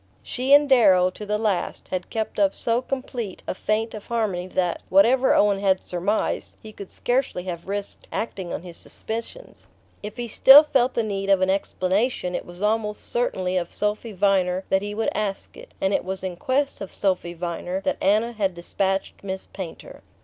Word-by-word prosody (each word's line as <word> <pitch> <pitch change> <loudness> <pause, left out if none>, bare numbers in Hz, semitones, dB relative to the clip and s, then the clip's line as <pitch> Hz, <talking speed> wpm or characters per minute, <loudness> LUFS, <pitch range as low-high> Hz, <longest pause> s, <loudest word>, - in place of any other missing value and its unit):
She 255 +2 -3
and 290 +1 +7
Darrow, 190 -9 +5
to 210 +3 -9
the 210 0 0
last, 210 -4 -2
had 185 -1 -4
kept 220 -1 -3
up 195 -1 +3
so 235 +1 0
complete 255 -6 -5
a - - -2
feint 215 +4 -1
of 215 -2 -9
harmony 205 -6 -1
that, 180 -2 -1
whatever 240 +8 +5
Owen 200 -1 +3
had 190 -2 +2
surmised, 185 +5 -2
he 215 -1 -12
could 200 -2 -10
scarcely 245 -7 -1
have 175 -2 -6
risked 200 0 -5
acting 190 -5 -4
on - - -4
his 175 -2 -10
suspicions. 230 - -7 0.3
If 210 +2 -8
he 240 -1 -3
still 270 +6 +9
felt 265 -4 +1
the 235 - +1
need 200 -2 -3
of 195 -1 +4
an 185 0 +3
explanation, 190 +1 0
it - - -4
was 175 +3 -8
almost 210 0 -1
certainly 185 -6 0
of 175 -1 -2
Sophy 210 +2 -2
Viner 190 -2 +1
that 190 - +2
he 205 +1 -5
would 225 - 0
ask 200 -2 -3
it; - - -13
and 190 +1 +1
it - - +1
was 190 0 -4
in 185 -2 -3
quest 270 +9 -1
of 195 - -6
Sophy 185 -3 -1
Viner 175 +2 -3
that - - -2
Anna 215 +4 +2
had 200 -5 -1
despatched 190 +3 -2
Miss 190 -1 -4
Painter. 185 -4 -9
200 Hz, 190 wpm, -24 LUFS, 185-225 Hz, 0.3 s, still